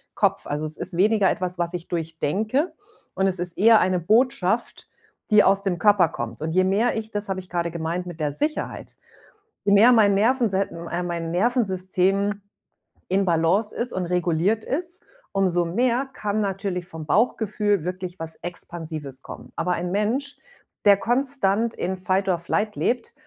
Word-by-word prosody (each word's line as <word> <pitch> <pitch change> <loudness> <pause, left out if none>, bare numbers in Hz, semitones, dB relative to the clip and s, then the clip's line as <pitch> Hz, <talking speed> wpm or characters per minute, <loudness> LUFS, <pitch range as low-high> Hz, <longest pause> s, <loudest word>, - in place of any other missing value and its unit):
Kopf. - - +1
Also, 150 +1 -2
es 155 - -3
ist 180 - -4
weniger 205 0 +4
etwas, 180 -1 -2
was 175 0 -1
ich 175 -1 -5
durchdenke 185 - -1 0.4
und 190 - +1
es 185 -2 0
ist 175 -1 -2
eher 225 +2 +6
eine 185 -1 +1
Botschaft, 225 +2 +1 0.4
die 210 0 +7
aus 195 0 +3
dem 185 -3 -1
Körper 200 -5 +4
kommt. 120 -5 -6
Und 160 - -2
je 185 +1 +4
mehr 205 +6 +1
ich 220 -1 -4
das 205 -1 -2
habe 190 -1 -2
ich 185 0 -11
grade 170 -1 -2
gemeint 170 +2 -3
mit 175 -2 -9
der 150 -2 0
Sicherheit 300 - -2 0.7
je 200 - +4
mehr 220 +5 +7
mein 210 -3 +5
Nervensei 220 -2 +2 0.3
äh, 175 +1 -1
mein 170 -2 -3
Nervensystem 195 -1 +1 0.7
in 195 +2 +2
Balance 175 +5 +1
ist 245 +1 -2
und 185 -1 -2
reguliert 180 +4 0
ist, 350 +6 -3 0.3
umso 180 -3 +2
mehr 245 +9 +1
kann 210 0 -2
natürlich 195 -2 -2
vom 160 -3 -8
Bauchgefühl 210 +1 +1
wirklich 185 0 -5
was 160 0 -6
Expansives 160 -5 -6
kommen. - - -11
Aber 180 +1 0
ein 175 +1 -3
Mensch, 235 +8 -1 0.5
der 200 -1 +7
konstant 235 -2 0
in 185 +2 -2
Fight 185 +2 0
or 175 -2 +1
Flight 210 +5 -1
lebt, 245 0 -1
190 Hz, 170 wpm, -24 LUFS, 175-215 Hz, 0.7 s, die